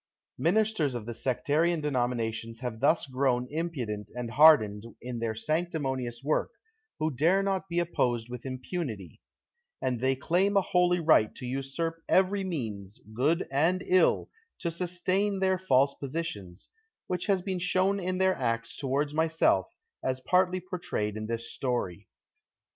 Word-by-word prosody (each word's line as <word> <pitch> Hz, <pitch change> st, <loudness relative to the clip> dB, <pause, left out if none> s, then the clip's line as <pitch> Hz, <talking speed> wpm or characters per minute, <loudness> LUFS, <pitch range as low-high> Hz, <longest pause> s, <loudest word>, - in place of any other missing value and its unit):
Ministers 170 Hz, -, +2 dB
of 115 Hz, -3 st, -5 dB
the 120 Hz, -, -5 dB
sectarian 150 Hz, +8 st, +1 dB
denominations 120 Hz, -5 st, -2 dB
have 120 Hz, -3 st, -4 dB
thus 145 Hz, +6 st, +3 dB
grown 130 Hz, -2 st, 0 dB
impudent 130 Hz, -11 st, -3 dB
and 120 Hz, -2 st, -4 dB
hardened 115 Hz, -9 st, +6 dB, 0.2 s
in 125 Hz, -1 st, -5 dB
their 115 Hz, -1 st, -2 dB
sanctimonious 135 Hz, -4 st, -2 dB
work, 150 Hz, +2 st, +1 dB, 0.5 s
who 155 Hz, +1 st, 0 dB
dare 175 Hz, +9 st, +3 dB
not 195 Hz, -1 st, -1 dB
be 170 Hz, -, -3 dB
opposed 125 Hz, -9 st, 0 dB
with 125 Hz, -1 st, -7 dB
impunity; 130 Hz, -, -5 dB, 0.6 s
and 130 Hz, -2 st, -1 dB
they 130 Hz, +2 st, +2 dB
claim 185 Hz, +9 st, +1 dB
a -, -, +6 dB
holy 180 Hz, -1 st, +2 dB
right 155 Hz, -10 st, +4 dB
to 125 Hz, -, -7 dB
usurp 135 Hz, +6 st, -3 dB
every 195 Hz, +1 st, +3 dB
means, 110 Hz, -, -5 dB
good 150 Hz, +10 st, +1 dB
and 165 Hz, +7 st, +2 dB
ill, 185 Hz, 0 st, +3 dB, 0.3 s
to 170 Hz, -, -2 dB
sustain 185 Hz, +4 st, -1 dB
their 190 Hz, -1 st, +2 dB
false 140 Hz, -6 st, +3 dB
positions, 130 Hz, -, -6 dB, 0.4 s
which 180 Hz, +1 st, -3 dB
has 195 Hz, -3 st, +2 dB
been 190 Hz, -2 st, -2 dB
shown 185 Hz, +2 st, +1 dB
in 185 Hz, 0 st, -2 dB
their 190 Hz, 0 st, +3 dB
acts 115 Hz, -2 st, -2 dB
toward 145 Hz, +2 st, -1 dB
myself, 160 Hz, -11 st, +2 dB, 0.3 s
as 130 Hz, 0 st, -1 dB
partly 185 Hz, +4 st, +2 dB
portrayed 175 Hz, -, -3 dB
in 110 Hz, 0 st, -5 dB
tliis 115 Hz, 0 st, -2 dB
story. 115 Hz, -6 st, -3 dB
145 Hz, 145 wpm, -29 LUFS, 120-180 Hz, 0.6 s, hardened